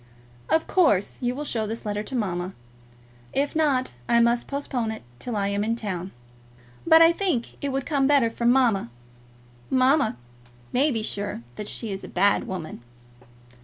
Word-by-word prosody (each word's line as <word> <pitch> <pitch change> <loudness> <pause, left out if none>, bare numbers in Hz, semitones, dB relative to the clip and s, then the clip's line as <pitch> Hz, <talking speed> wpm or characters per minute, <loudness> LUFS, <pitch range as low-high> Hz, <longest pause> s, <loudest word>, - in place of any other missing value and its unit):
Of 320 - +2
course 210 - +2
you 245 0 -1
will 295 - -4
show 220 -6 -1
this 225 +1 -5
letter 210 0 -2
to 235 +5 -5
mamma. 185 -5 -2 0.8
If 280 +2 0
not, 280 - +1 0.2
I 235 - +5
must 235 +1 +2
postpone 270 -5 -2
it 220 - -6 0.2
till 245 -3 -4
I 200 -1 0
am 200 0 0
in 225 +2 0
town; 190 -5 -4 0.8
but 325 0 +8
I 330 - +7
think 340 -11 -2
it 285 - 0
would 270 0 -2
come 280 -4 +1
better 275 -6 +4
from 235 +1 +1
mamma. 240 - +3 0.8
Mamma 260 - +3 0.6
may 275 +5 +3
be 225 -6 -1
sure 205 - -3
that 210 - -6
she 225 -1 -3
is 195 - -5
a - - -7
bad 200 +3 +2
woman. 175 -9 -6
235 Hz, 170 wpm, -25 LUFS, 205-275 Hz, 0.8 s, but